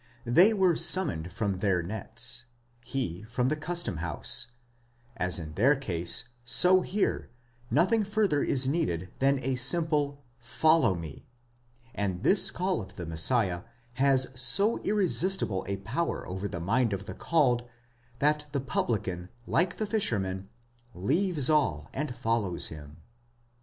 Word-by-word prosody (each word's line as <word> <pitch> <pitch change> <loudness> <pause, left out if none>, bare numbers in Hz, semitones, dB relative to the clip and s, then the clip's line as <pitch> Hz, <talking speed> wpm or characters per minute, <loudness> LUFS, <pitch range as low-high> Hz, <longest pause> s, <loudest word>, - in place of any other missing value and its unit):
They 170 - +5
were 190 -5 +3
summoned 135 - +1
from 100 -1 -2
their 95 -3 +1
nets; 110 +5 -4 0.4
he 115 -8 -4
from 125 +4 -1
the 155 - 0
custom 160 - -3
house; 80 -2 -1 0.7
as 90 0 +1
in 80 -3 -6
their 130 - +4
case, 95 - -1 0.2
so 180 +9 +5
here, 195 +3 -1 0.4
nothing 185 - +3
further 205 -7 +1
is 130 -1 0
needed 95 - -1
than 140 +1 +3
a 130 +1 0
simple 145 0 +1 0.2
follow 140 - +3
me; 80 -5 -9 0.7
and 100 -4 -3
this 195 - +5
call 185 -5 -1
of 95 - -11
the 90 - -6
Messiah 90 +3 +2 0.3
has 130 0 +3
so 165 - +2
ftresistible 190 - 0
a 100 - -1
power 120 - -3
over 95 +2 -4
the 90 - -5
mind 115 +6 +1
of 100 0 -4
the - - -6
called, 125 -7 +1 0.5
that 150 +2 +1
the 140 - 0
publican, 95 -9 -2 0.2
like 175 +5 0
the 215 - -1
fishermen, 100 - -2 0.5
eaves 155 - +1
all, 80 - +1
and 135 -3 -3
follows 115 -7 -1
him. 75 -1 -11
125 Hz, 135 wpm, -28 LUFS, 95-160 Hz, 0.7 s, They